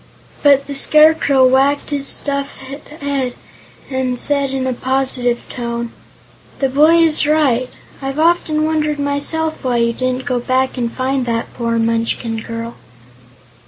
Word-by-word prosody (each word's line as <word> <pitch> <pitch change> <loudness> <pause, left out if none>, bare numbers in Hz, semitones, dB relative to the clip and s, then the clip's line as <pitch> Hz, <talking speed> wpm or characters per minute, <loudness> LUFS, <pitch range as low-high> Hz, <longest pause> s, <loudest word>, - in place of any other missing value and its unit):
But 280 -1 +4
the 285 - -6
Scarecrow 305 -2 +4
wagged 275 +3 +1
his 280 -1 0
stuffed 280 0 -1
head 280 -1 -5 0.5
and 260 -2 -2
said 280 -1 +1
in 265 -1 -2
a 260 - -1
positive 255 -1 -1
tone: 235 -1 -5 0.7
"This 270 -2 -1
boy 305 +4 +5
is 325 -3 +3
right. 275 -5 +1 0.2
I've 270 +1 -4
often 315 -1 +2
wondered, 305 -1 0
myself, 290 +3 -2
why 250 -2 0
you 235 0 +1
didn't 255 +1 -2
go 250 -1 -1
back 260 +2 0
and 240 -2 -2
find 260 0 -2
that 230 -1 -2
poor 230 -1 -2
Munchkin 230 0 -1
girl." 230 +1 -7
270 Hz, 140 wpm, -17 LUFS, 245-290 Hz, 0.7 s, boy